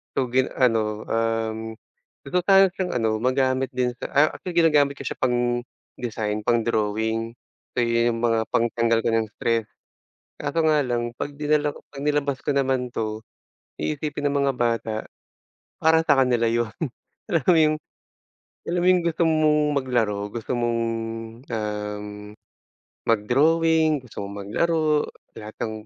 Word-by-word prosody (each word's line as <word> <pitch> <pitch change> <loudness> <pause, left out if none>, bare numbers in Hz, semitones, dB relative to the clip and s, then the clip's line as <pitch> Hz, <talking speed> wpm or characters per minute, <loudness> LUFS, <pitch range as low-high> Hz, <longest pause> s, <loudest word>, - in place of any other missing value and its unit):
So 130 -3 0
gin 130 +1 +3
ano, 110 -4 +1
um, 115 0 -1 0.5
gusto 180 - 0
ko - - -4
sanang 195 -1 +6
siyang 185 0 -3
ano 110 -2 +1
magamit 130 +1 +1
din 125 -1 +1
sa - - -4
ah, 145 +2 +6
actually 180 -2 -7
ginagamit 150 -4 +4
ko - - -8
siya - - -5
pang-design, 120 -3 -2
pang-drawing. 110 0 0 0.4
So 120 - +2
iyong 115 0 +2
yung 115 - -5
mga 115 -1 +3
pagtanggal 115 0 +1
ko - - +1
ng 115 -1 +1
stress, 115 -2 0 0.7
kaso 145 +3 -2
nga 150 -2 +3
lang 120 -2 -2
pag 145 - -4
dinala 150 0 +2
ko - - -13
pag 140 -1 -9
nilabas 145 -2 0
ko - - 0
naman 130 -3 0
'to, 110 -1 -3 0.6
iisipin 145 - -2
ng 140 - -2
mga 135 - +1
bata 115 -3 -1 0.8
para 160 0 +3
sa 140 -3 +5
kanila 120 -2 +2
'yon. 115 -1 0 0.6
Alam 165 - +1
mo 170 - +5
yung 155 0 +4 1.0
alam 175 - +1
mo - - +4
yung 180 -1 +4
gusto 170 0 -1
mong 155 -1 +3 0.2
maglaro, 120 -7 0
gusto 115 0 -5
mong, 120 -1 0 0.7
um, 105 -1 -3 1.0
mag-drawing, 155 +7 +3
gusto 105 - -7
mong 100 0 -7
maglaro, 155 +5 +1 0.3
lahat 110 0 -9
ng 110 - -5
120 Hz, 150 wpm, -24 LUFS, 115-150 Hz, 1.0 s, sanang